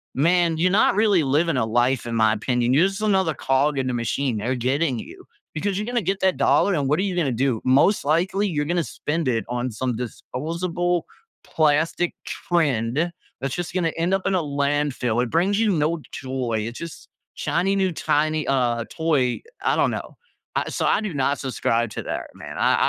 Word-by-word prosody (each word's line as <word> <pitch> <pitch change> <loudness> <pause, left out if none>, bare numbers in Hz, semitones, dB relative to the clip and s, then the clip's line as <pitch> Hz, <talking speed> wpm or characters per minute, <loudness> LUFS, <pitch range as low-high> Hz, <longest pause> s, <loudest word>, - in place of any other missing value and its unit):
man, 170 +3 +3
you're 180 +3 +2
not 195 - +4
really 205 -5 +3
living 150 +5 +1
a - - +2
life, 120 +3 +1
in 115 -1 -3
my 110 -1 +4
opinion. 120 +3 0
You're 160 +8 +5
just 195 +2 -5
another 190 -6 +2
cog 140 +2 +1
in 130 - -1
the 130 - -1
machine, 120 +1 -1
they're 120 +5 -1
getting 130 +3 0
you. - - -11 0.3
Because 190 +5 -2
you're 210 +2 -3
gonna 245 -1 0
get 190 +2 -1
that 190 -1 +2
dollar, 200 - +3
and 145 -3 0
what 150 - +2
are - - +1
you 195 -3 -1
gonna 160 -7 +1
do? 125 -1 0
Most 140 +10 +4
likely, 180 +7 +1
you're 150 -6 -1
gonna 170 +2 0
spend 160 0 -3
it 115 -3 +1
on 125 +1 -2
some 125 +2 -2
disposable 170 +8 -2 0.4
plastic 160 +3 +1
trend, 150 -1 0 0.3
that's 135 -1 -2
just 175 -1 -4
gonna 175 -3 +1
end 170 +3 0
up 195 -1 0
in - - +1
a 180 - +2
landfill. 140 -4 0
It 125 - -4
brings 190 +6 +2
you 225 -1 +3
no 160 -1 0
joy, 130 -5 -2
it's 120 - -7
just 170 -1 -9 0.3
shiny 195 +2 0
new 190 -2 +1
tiny, 155 -1 0
uh, 120 -4 +1
toy. 150 -6 0 0.2
I - - +2
don't - - +3
know. - - -6 0.4
I - - 0
so - - -2
I - - +3
do 210 -5 -4
not 140 0 +1
subscribe 120 -3 0
to - - -5
that, - - -4
man. - - -9
I - - +3
150 Hz, 200 wpm, -23 LUFS, 130-175 Hz, 0.4 s, You're